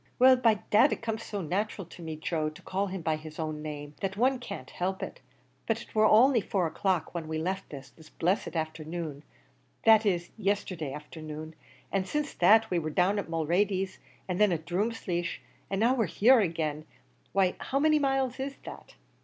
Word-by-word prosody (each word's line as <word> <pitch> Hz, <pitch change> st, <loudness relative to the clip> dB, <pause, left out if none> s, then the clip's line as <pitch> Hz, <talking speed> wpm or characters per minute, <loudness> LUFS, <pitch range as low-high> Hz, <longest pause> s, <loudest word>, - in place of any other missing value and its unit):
"Well, 260 Hz, +1 st, +7 dB
by 235 Hz, -4 st, +4 dB, 0.2 s
dad, 235 Hz, +7 st, +6 dB
it -, -, -3 dB
comes 225 Hz, -1 st, -2 dB
so 205 Hz, -3 st, -4 dB
natural 195 Hz, +4 st, -2 dB
to 175 Hz, -, -13 dB
me, 160 Hz, -1 st, -5 dB
Joe, 155 Hz, 0 st, -1 dB
to 155 Hz, -, -14 dB
call 195 Hz, +2 st, -1 dB
him 190 Hz, -1 st, -5 dB
by 160 Hz, -1 st, +1 dB
his 155 Hz, 0 st, -10 dB
own 155 Hz, -1 st, -3 dB
name, 145 Hz, -1 st, -6 dB
that 195 Hz, 0 st, -2 dB
one 255 Hz, +3 st, +2 dB
can't 220 Hz, -5 st, -8 dB
help 190 Hz, +2 st, -2 dB
it; -, -, -7 dB, 0.5 s
but 225 Hz, 0 st, +1 dB
it -, -, -12 dB
war 215 Hz, 0 st, +4 dB
only 235 Hz, +3 st, +6 dB
four 190 Hz, -2 st, 0 dB
o'clock 170 Hz, +1 st, -1 dB
when 170 Hz, -2 st, -4 dB
we 160 Hz, 0 st, -2 dB
left 185 Hz, +4 st, -3 dB
this, 135 Hz, -3 st, -9 dB
this 155 Hz, +5 st, -17 dB
blessed 180 Hz, +2 st, -1 dB
afthernoon 155 Hz, -1 st, -4 dB, 0.6 s
that 220 Hz, -1 st, +7 dB
is, 175 Hz, -5 st, 0 dB
yesterday 185 Hz, -7 st, -1 dB
afthernoon 155 Hz, +1 st, -8 dB, 0.4 s
an' 195 Hz, -1 st, 0 dB
since 295 Hz, +7 st, -2 dB
that 220 Hz, +4 st, +5 dB
we 175 Hz, -, +2 dB
wor 155 Hz, -1 st, -3 dB
down 185 Hz, +6 st, +2 dB
at 200 Hz, -, -5 dB
Mulready's, 185 Hz, +4 st, 0 dB, 0.3 s
an' 180 Hz, 0 st, -2 dB
then 210 Hz, -2 st, +5 dB
at 160 Hz, -2 st, -2 dB
Drumleesh, 175 Hz, -2 st, -2 dB, 0.3 s
an' 195 Hz, -, -1 dB
now 230 Hz, +5 st, +4 dB
we're 230 Hz, -6 st, +1 dB
here 240 Hz, +9 st, +5 dB
agin; 155 Hz, -4 st, -2 dB, 0.5 s
why 190 Hz, -2 st, +2 dB
how 270 Hz, -, -2 dB
many 305 Hz, +1 st, +4 dB
miles 270 Hz, -2 st, 0 dB
is 275 Hz, +1 st, -3 dB
that?" -, -, -10 dB
185 Hz, 195 wpm, -29 LUFS, 160-220 Hz, 0.6 s, Well